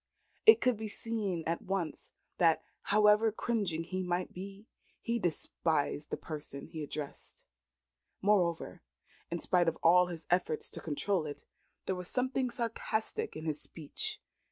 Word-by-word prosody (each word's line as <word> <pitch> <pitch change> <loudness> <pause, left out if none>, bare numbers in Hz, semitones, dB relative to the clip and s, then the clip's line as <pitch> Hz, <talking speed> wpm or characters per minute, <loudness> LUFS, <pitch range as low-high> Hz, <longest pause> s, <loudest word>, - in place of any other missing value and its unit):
It 445 - +10
could 250 -3 +3
be 220 0 -4
seen 205 -5 -2
at 165 +1 -1
once 185 -4 -3 0.3
that, 165 -2 +4 0.2
however 210 +1 +5
cringing 200 -8 -1
he 185 +2 -3
might 180 0 -1
be, 195 +3 -8 0.3
he 235 0 -1
despised 160 -4 0
the - - -2
person 145 -3 -7
he 160 - -7
addressed. 145 -1 -7 0.7
Moreover, 185 -5 +1 0.5
in 170 - -1
spite 175 0 +2
of 165 - +1
all 180 +2 +7
his 165 -3 -6
efforts 175 -3 +1
to - - -6
control 165 +2 0
it, 145 - -8 0.4
there - - 0
was 180 -1 -5
something 255 +2 +1
sarcastic 230 -2 -2
in 155 - -6
his 155 -2 -1
speech. 430 - -3
180 Hz, 145 wpm, -33 LUFS, 165-215 Hz, 0.7 s, It